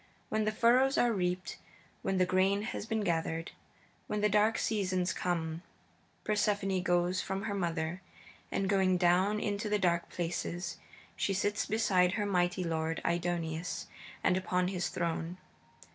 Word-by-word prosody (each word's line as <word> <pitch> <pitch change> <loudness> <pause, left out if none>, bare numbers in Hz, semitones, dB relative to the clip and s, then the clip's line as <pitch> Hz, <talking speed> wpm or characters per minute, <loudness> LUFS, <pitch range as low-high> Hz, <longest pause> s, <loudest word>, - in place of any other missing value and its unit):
When 215 0 +1
the 215 - +2
furrows 250 +5 +4
are 240 -1 +3
reaped, 180 -1 -2 0.4
when 195 - 0
the 185 - +4
grain 190 +3 +2
has 220 -1 -4
been 220 -1 0
gathered, 165 -3 -1 0.6
when 210 0 -1
the 210 - +3
dark 210 +2 +3
season 185 -4 0
comes, 165 -3 -2 0.6
Persephone 205 -3 +1
goes 175 +1 +1
from 190 +1 -3
her 215 -2 -2
mother, 170 -2 -2 0.5
and 195 - 0
going 190 -2 +3
down 185 +4 +3
into 205 +1 -2
the 210 - +2
dark 170 -3 +1
places, 175 +1 -3 0.4
she 195 - 0
sits 205 +2 0
beside 195 -4 +3
her 210 - 0
mighty 180 -1 +1
lord 165 -1 -1
Aidoneus 170 -1 -1 0.4
and 180 - +3
upon 180 -1 0
his 180 -2 -2
throne. 170 0 -2
185 Hz, 145 wpm, -32 LUFS, 175-205 Hz, 0.6 s, furrows